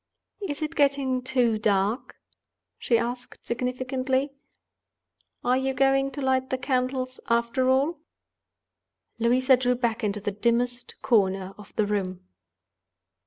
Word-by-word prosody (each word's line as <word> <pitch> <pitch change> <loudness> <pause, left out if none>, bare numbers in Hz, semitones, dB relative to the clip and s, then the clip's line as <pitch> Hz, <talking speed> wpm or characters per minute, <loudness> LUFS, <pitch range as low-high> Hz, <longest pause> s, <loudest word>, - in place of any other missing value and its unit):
"Is 310 -6 -3
it 305 +1 -3
getting 275 -3 +2
too 250 -4 +1
dark?" 205 +3 0 0.6
she 235 - +2
asked, 245 +2 -4
significantly. 255 +2 -1 1.1
"Are 250 - +3
you 265 0 -1
going 270 0 +3
to 280 - -4
light 260 0 +1
the 260 - 0
candles, 255 -1 -1
after 235 +2 +2
all?" 280 +5 +2 1.2
Louisa 255 +3 +4
drew 250 0 +1
back 235 -1 -1
into 210 0 0
the 205 0 -2
dimmest 240 +4 0
corner 195 -5 +2
of 210 -1 -14
the 215 - +2
room. 190 -3 -2
250 Hz, 120 wpm, -26 LUFS, 230-265 Hz, 1.2 s, Louisa